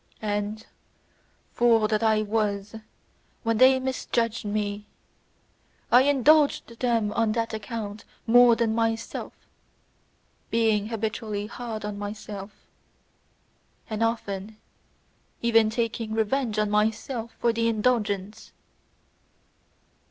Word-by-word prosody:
And, 210 Hz, +1 st, -2 dB, 0.9 s
fool 230 Hz, -2 st, +4 dB
that 215 Hz, 0 st, 0 dB
I 220 Hz, -1 st, +3 dB
was, 210 Hz, -1 st, -2 dB, 0.7 s
when 225 Hz, -2 st, 0 dB
they 260 Hz, 0 st, +6 dB
misjudged 235 Hz, -4 st, -2 dB
me, 205 Hz, 0 st, -3 dB, 1.0 s
I 245 Hz, -, +8 dB
indulged 285 Hz, -3 st, +3 dB
them 230 Hz, -4 st, +1 dB
on 225 Hz, -2 st, +1 dB
that 230 Hz, -1 st, -2 dB
account 215 Hz, -1 st, -5 dB, 0.2 s
more 240 Hz, 0 st, +6 dB
than 225 Hz, -1 st, 0 dB
myself, 225 Hz, 0 st, -2 dB, 1.2 s
being 220 Hz, -2 st, +1 dB
habitually 215 Hz, -2 st, -3 dB
hard 225 Hz, -1 st, -6 dB
on 205 Hz, -1 st, -5 dB
myself, 205 Hz, -1 st, -6 dB, 1.4 s
and 215 Hz, 0 st, -3 dB
often 215 Hz, -2 st, -2 dB, 0.9 s
even 225 Hz, -2 st, +4 dB
taking 225 Hz, -1 st, -2 dB
revenge 225 Hz, 0 st, 0 dB
on 210 Hz, -1 st, +1 dB
myself 220 Hz, +3 st, -1 dB
for 235 Hz, -1 st, +2 dB
the 230 Hz, 0 st, 0 dB
indulgence. 215 Hz, -3 st, -1 dB
220 Hz, 100 wpm, -26 LUFS, 210-230 Hz, 1.4 s, I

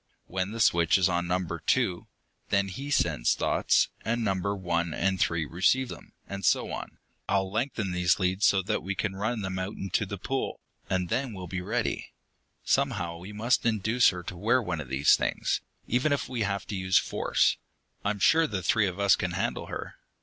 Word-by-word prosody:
When 95 Hz, +1 st, -2 dB
the 115 Hz, +2 st, -6 dB
switch 85 Hz, -5 st, +4 dB
is 95 Hz, -1 st, +3 dB
on 90 Hz, -1 st, 0 dB
Number 90 Hz, -2 st, -1 dB
Two, 95 Hz, -1 st, 0 dB, 0.4 s
then 100 Hz, -1 st, +2 dB
he 135 Hz, +10 st, -6 dB
sends 85 Hz, -, +2 dB
thoughts, -, -, +2 dB
and 115 Hz, +2 st, -1 dB
Numbers 100 Hz, 0 st, 0 dB
One 85 Hz, -3 st, -1 dB
and 95 Hz, 0 st, 0 dB
Three 85 Hz, -2 st, +1 dB
receive 95 Hz, -, +2 dB
them. -, -, -10 dB
And 100 Hz, 0 st, -6 dB
so -, -, +2 dB
on. -, -, -6 dB, 0.3 s
I'll 95 Hz, -1 st, +1 dB
lengthen 110 Hz, -3 st, -1 dB
these 90 Hz, -1 st, +2 dB
leads 95 Hz, +1 st, +2 dB
so 95 Hz, -1 st, +3 dB
that 95 Hz, -, -1 dB
we 95 Hz, +1 st, -3 dB
can 100 Hz, -1 st, -2 dB
run 110 Hz, +3 st, -2 dB
them 95 Hz, -1 st, -3 dB
out 95 Hz, +3 st, -3 dB
into 95 Hz, -, -1 dB
the -, -, -5 dB
pool, -, -, -3 dB, 0.3 s
and 90 Hz, -2 st, 0 dB
then 130 Hz, -3 st, -1 dB
we'll 95 Hz, -2 st, -7 dB
be 95 Hz, +1 st, -4 dB
ready. 90 Hz, -, -2 dB, 0.5 s
Somehow 105 Hz, -12 st, 0 dB
we 90 Hz, +4 st, -9 dB
must 110 Hz, +4 st, +1 dB
induce 110 Hz, +1 st, +3 dB
her 90 Hz, -1 st, -5 dB
to 90 Hz, -, -6 dB
wear 110 Hz, +8 st, +2 dB
one 90 Hz, -9 st, -3 dB
of 65 Hz, -, -9 dB
these 70 Hz, +2 st, +5 dB
things, -, -, -1 dB, 0.2 s
even 125 Hz, +6 st, +1 dB
if 145 Hz, -, 0 dB
we 125 Hz, -3 st, -4 dB
have 100 Hz, -2 st, -1 dB
to 105 Hz, -, -3 dB
use 95 Hz, 0 st, +2 dB
force. -, -, +2 dB, 0.5 s
I'm 105 Hz, 0 st, 0 dB
sure 160 Hz, +10 st, +4 dB
the 95 Hz, -7 st, -3 dB
three 105 Hz, +3 st, +3 dB
of 90 Hz, +1 st, -5 dB
us 100 Hz, -1 st, +5 dB
can 90 Hz, -1 st, -3 dB
handle -, -, -2 dB
her." -, -, -6 dB
95 Hz, 200 wpm, -28 LUFS, 90-110 Hz, 0.5 s, these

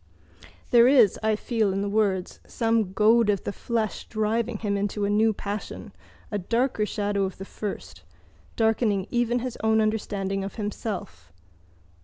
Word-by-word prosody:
There 240 Hz, -1 st, +7 dB
is, 250 Hz, -7 st, +5 dB
I 220 Hz, 0 st, +2 dB
feel 220 Hz, -2 st, 0 dB
in 195 Hz, +1 st, -1 dB
the -, -, -2 dB
words, 200 Hz, -3 st, 0 dB
some 225 Hz, -4 st, 0 dB
goad 220 Hz, +2 st, +4 dB
of 200 Hz, -3 st, +1 dB
the 200 Hz, -, -3 dB
flesh 225 Hz, -2 st, -3 dB
driving 220 Hz, +1 st, -1 dB
him 205 Hz, -1 st, -1 dB
into 205 Hz, +1 st, -1 dB
a 200 Hz, -, 0 dB
new 220 Hz, +2 st, +4 dB
passion, 205 Hz, 0 st, -6 dB, 0.4 s
a 205 Hz, -, -1 dB
darker 230 Hz, +2 st, 0 dB
shadow 205 Hz, -2 st, -1 dB
of 190 Hz, -, -6 dB
the 195 Hz, -, -7 dB
first, 205 Hz, 0 st, -7 dB, 0.5 s
darkening 220 Hz, -3 st, +1 dB
even 240 Hz, 0 st, +1 dB
his 250 Hz, -1 st, -5 dB
own 220 Hz, 0 st, +3 dB
understanding 200 Hz, -3 st, -1 dB
of 195 Hz, -, -6 dB
himself. 205 Hz, -, -5 dB
215 Hz, 155 wpm, -25 LUFS, 200-225 Hz, 0.5 s, There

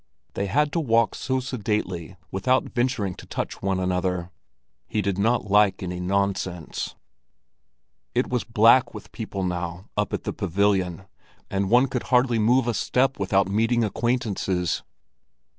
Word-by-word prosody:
They 100 Hz, -, -2 dB
had 150 Hz, +8 st, +2 dB
to 170 Hz, -, 0 dB
walk 115 Hz, -6 st, +2 dB
so 130 Hz, -1 st, -1 dB
sedately 105 Hz, -8 st, -3 dB
without 125 Hz, +8 st, +2 dB
venturing 120 Hz, -6 st, 0 dB
to -, -, -13 dB
touch -, -, -4 dB
one 95 Hz, -1 st, 0 dB
another. 90 Hz, -1 st, -1 dB, 0.6 s
He 110 Hz, -, -2 dB
did 100 Hz, 0 st, -1 dB
not 110 Hz, -1 st, +1 dB
like 100 Hz, -2 st, +4 dB
any 90 Hz, -1 st, -4 dB
nonsense. 95 Hz, -2 st, -2 dB, 1.2 s
It 125 Hz, -, +2 dB
was 125 Hz, -2 st, -1 dB
black 115 Hz, +3 st, +4 dB
with -, -, -10 dB
people 105 Hz, -4 st, -4 dB
now 90 Hz, 0 st, -4 dB
up -, -, 0 dB
at -, -, -3 dB
the -, -, -3 dB
pavilion, 95 Hz, -1 st, 0 dB, 0.5 s
and 95 Hz, -1 st, 0 dB
one 125 Hz, +4 st, +5 dB
could 125 Hz, -2 st, -3 dB
hardly 125 Hz, -2 st, +3 dB
move 120 Hz, +4 st, +3 dB
a 120 Hz, -, +1 dB
step 130 Hz, +4 st, +1 dB
without 95 Hz, 0 st, +2 dB
meeting 115 Hz, +4 st, +2 dB
acquaintances. 105 Hz, -6 st, -1 dB
100 Hz, 145 wpm, -25 LUFS, 95-120 Hz, 1.2 s, one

